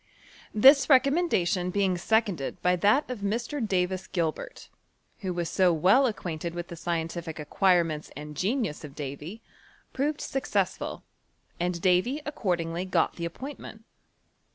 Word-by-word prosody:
This 270 +6 +6
recommendation 260 - +3
being 190 -1 +1
seconded 195 -5 0
by 180 0 +4
that 210 - +3
of 250 -3 -5
Mr, 235 +7 -2
Davis 185 -2 -1
Gilbert, 165 -4 -3 0.5
who 190 -5 -3
was 175 -1 -2
so 185 0 +3
well 190 - +4
ac 220 - -2
quainted 170 -1 -5
wilh 175 0 -4
the 170 - -9
scientific 165 -1 -3
acquirements 165 0 +1
and 150 0 -8
gentua 210 - 0
of 145 -2 -10
Davy, 150 +9 -7 0.5
proved 295 +3 -1
successful, 270 - -2 0.6
and 175 0 -1
Davy 185 +10 +2
accordinglji 180 - -2
got 170 -3 +1
the 170 - -3
appointment. 225 - -8
185 Hz, 130 wpm, -27 LUFS, 170-230 Hz, 0.6 s, This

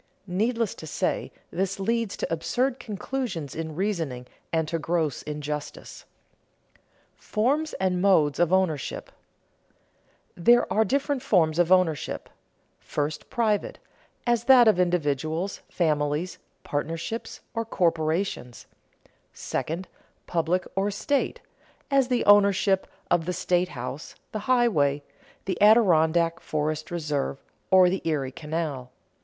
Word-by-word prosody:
Needless 220 +4 0
to 160 - -10
say, - - -2 0.2
this 195 +2 -2
leads 230 +1 -1
to - - -2
absurd 245 - -1
conclusions 210 - -4
in 160 -1 -5
reasoning, 165 -10 -2 0.3
and 160 -1 0
to 165 - -1
gross 160 -2 -1
injustice. 150 0 -6 1.1
[Sidenote: - - -35
Forms 280 +9 0
and 185 -1 0
modes 160 -8 +3
of 175 -1 +3
ownership] 185 -7 0 1.2
There 240 +7 +5
are 220 - +4
different 275 +4 0
forms 175 - +2
of 175 0 +3
ownership: 180 -5 +1 0.5
first, 150 +1 -4
private, 220 -5 0 0.5
as 240 -1 +1
that 255 -3 +7
of 210 -4 +4
individuals, 165 +1 0
families, 150 +1 0 0.2
partnerships, 165 +9 -4
or 230 - -1
corporations; 165 - -1 0.7
second, 170 +4 -3 0.4
public 175 +2 0
or 195 +1 +1
state, 270 +7 -1 0.5
as 275 -2 +4
the 250 -2 0
ownership 200 -1 +4 0.2
of 165 -2 +3
the 180 - 0
state 180 +1 +1
house, 135 +1 -7 0.2
the 215 - -3
highway, 155 - +3 0.4
the 185 -2 -3
Adirondack 170 -6 +4
forest 155 0 -2
reserve 150 -5 -2 0.3
or 185 -1 +7
the 185 +1 -1
Erie 145 -5 -1
Canal. 150 -4 -4
175 Hz, 115 wpm, -26 LUFS, 155-210 Hz, 1.2 s, that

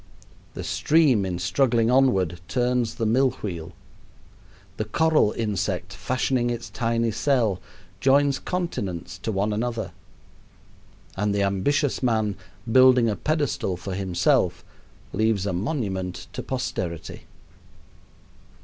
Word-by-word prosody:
The - - -5
stream 145 -11 +3
in 90 -2 -3
struggling 115 +6 +2
onward 95 -11 +2
turns 125 -2 0
the 115 - -2
mill 130 +5 +3
wheel; 85 -3 -5 1.0
the 110 - -2
coral 155 0 +3
insect, 100 -4 -2
fashioning 125 0 0
its 120 0 -4
tiny 115 -2 0
cell, 110 -5 +1 0.4
joins 140 +3 +3
continents 100 - -4
to 110 - -3
one 105 +1 0
another; 115 +1 -2 1.2
and 100 +1 0
the 100 - +2
ambitious 125 +9 +1
man, 110 -5 +1 0.4
building 130 -2 +6
a 105 - 0
pedestal 145 - -1
for 95 +1 -6
himself, 90 -2 +1 0.5
leaves 110 -1 +1
a 100 - -1
monument 95 - -3
to - - -4
posterity. 90 -10 -4
110 Hz, 115 wpm, -24 LUFS, 95-130 Hz, 1.2 s, building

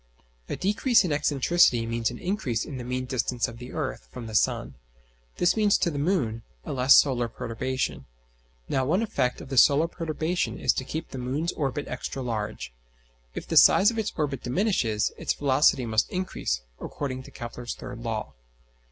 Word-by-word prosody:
A - - -2
decrease 210 +5 +3
in 180 - -2
excentricity 145 -3 +3
means 115 -1 0
an 120 - -7
increase 160 - -2
in 140 - -7
mean 130 0 -2
distance 125 -1 -1
of 115 0 -10
the 125 +1 -9
earth - - -4
from 120 - -7
the 110 - -8
sun. 110 - +1 0.6
This 175 - +3
means 210 -2 +3
to 170 - 0
the 145 - -3
moon 140 - 0 0.2
a - - -4
less 130 0 +6
solar 125 -4 +4
perturbation. 130 +3 -3 0.6
Now 130 - 0
one 180 - +1
effect 130 - -1
of - - -10
the 135 - -3
solar 145 +7 +5
perturbation 165 +1 -2
is - - +2
to - - -3
keep 160 +5 -5
the 130 - -7
moon's 140 +7 -2
orbit 145 -1 -3
extra 130 +1 -5
large: 110 - -4 0.6
if - - -6
the - - 0
size 205 +4 +7
of 225 - -3
its 215 -1 -1
orbit 145 -5 -1
diminishes, 125 - 0
its - - -1
velocity 135 -2 +3
must 110 -1 +1
increase, 180 - -2 0.2
according 130 -3 -5
to - - -13
Kepler's 120 0 -7
third 125 -2 -8
law. 115 -2 -4
130 Hz, 180 wpm, -26 LUFS, 120-165 Hz, 0.6 s, size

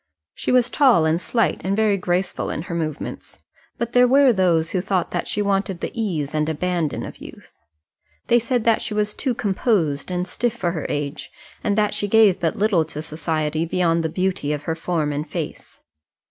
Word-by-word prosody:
She - - -3
was 250 -1 +3
tall 250 - +4
and 160 +2 +1
slight, 230 +2 0
and 195 +1 0
very 215 -1 +3
graceful 180 -1 -1
in 155 - -3
her 180 - -6
movements; 155 -3 -5 0.4
but 235 0 -3
there 250 0 +6
were 270 0 +5
those 170 -4 +2
who 185 - 0
thought 185 -2 -1
that 175 - -2
she 205 - -1
wanted 195 -2 0
the - - -4
ease 170 -11 -2
and 155 0 0
abandon 165 -1 -1
of - - -9
youth. - - -13 0.7
They 240 - +4
said 240 0 -1
that 230 -1 +3
she 210 - -4
was 210 0 0
too 255 0 -2
composed 190 - 0
and 180 0 -2
stiff 240 +5 -1
for 175 -7 -1
her 160 -4 -4
age, 145 +1 -4 0.3
and 205 0 0
that 210 -1 +2
she 205 - -1
gave 210 -3 +5
but 165 -2 0
little 200 -5 +2
to 155 -1 -6
society 155 0 -2
beyond 170 -1 +1
the 160 - -1
beauty 180 -3 -1
of 145 -1 -4
her 160 - -1
form 160 -3 -1
and 145 +1 -4
face. - - -6
180 Hz, 200 wpm, -22 LUFS, 160-215 Hz, 0.7 s, there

